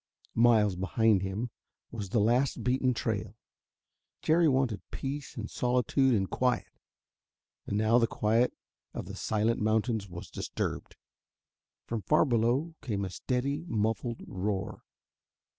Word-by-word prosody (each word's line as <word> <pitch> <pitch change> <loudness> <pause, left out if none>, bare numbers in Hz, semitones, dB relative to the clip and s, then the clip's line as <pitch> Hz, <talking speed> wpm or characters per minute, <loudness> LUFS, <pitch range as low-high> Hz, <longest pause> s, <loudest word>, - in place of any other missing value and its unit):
Miles 110 -4 +4
behind 100 +2 +2
him 100 +5 -3 0.4
was 105 -5 -5
the 115 - 0
last 120 +3 +2
beaten 130 +1 +2
trail: 110 -3 -3 0.9
Jerry 165 +1 +4
wanted 130 -6 +1
peace 140 0 -5
and 110 -2 -4
solitude 125 +2 +2
and 95 -2 +1
quiet. 125 +4 0 1.0
And 100 - -1
now 110 +3 +4
the 115 - +3
quiet 115 +4 +2 0.4
of - - -4
the - - -7
silent 110 +2 0
mountains 110 -1 +1
was 85 0 -9
disturbed. - - -4 0.9
From 115 -2 -3
far 155 +9 +3
below 125 +6 +1
came 100 -5 -2
a 95 - -5
steady, 135 - -2
muffled 115 +1 -1
roar. 100 +2 -3
115 Hz, 125 wpm, -30 LUFS, 105-125 Hz, 1.0 s, Miles